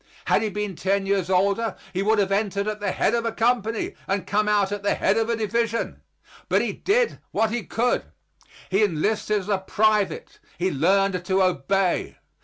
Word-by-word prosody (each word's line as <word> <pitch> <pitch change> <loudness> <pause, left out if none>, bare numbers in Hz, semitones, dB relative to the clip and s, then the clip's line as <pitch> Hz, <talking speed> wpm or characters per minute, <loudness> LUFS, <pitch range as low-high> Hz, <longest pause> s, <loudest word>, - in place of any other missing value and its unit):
Had - - +3
he 220 - -1
been 210 -1 -4
ten 195 +3 0
years 195 -2 0
older 200 +3 +1 0.2
he 185 - -1
would 215 +2 +2
have 195 -1 +1
entered 200 0 0
at 215 0 -3
the 205 -2 -1
head - - +1
of 235 -1 +1
a 230 - -1
company 225 -1 0
and 195 0 -1
come 210 +1 +1
out 205 -2 +2
at 205 -1 -3
the 200 - +1
head 195 - +2
of 225 0 0
a 235 - +2
division. 230 +1 -1 0.5
But - - +3
he - - -2
did 470 +4 +1
what 220 -1 +1
he 240 +1 -1
could. 245 +2 0 0.7
He 195 +3 +3
enlisted 210 +3 0
as 185 - -11
a 200 -2 +2
private; 210 +1 0 0.2
he 185 +2 0
learned 185 +4 +2
to 190 0 +2
obey. 185 0 0
205 Hz, 195 wpm, -24 LUFS, 195-220 Hz, 0.7 s, Had